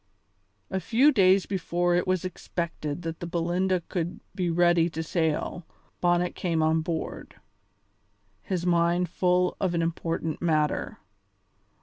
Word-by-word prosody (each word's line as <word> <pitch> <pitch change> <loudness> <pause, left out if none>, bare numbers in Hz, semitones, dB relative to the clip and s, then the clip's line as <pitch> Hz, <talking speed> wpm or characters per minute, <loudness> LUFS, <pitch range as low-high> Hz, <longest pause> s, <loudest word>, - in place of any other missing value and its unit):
A 190 - 0
few 240 - +4
days 190 -5 +4
before 175 -2 0
it 175 +1 +1
was 185 -1 0
expected 170 -3 -4
that 165 -1 -5
the 175 - -5
Belinda 175 +2 0
would 175 -1 -2
be 185 -3 -1
ready 175 0 +3
to 160 0 -4
sail 160 +1 -1 0.4
Bonnet 175 0 +2
came 165 -3 0
on 160 +1 +2
board, 165 0 -5 1.1
his 180 -2 -3
mind 175 0 +2
full 180 +1 +1
of 185 -3 0
an 165 - +1
important 165 -1 -2
matter. 155 -3 0
175 Hz, 130 wpm, -27 LUFS, 165-180 Hz, 1.1 s, few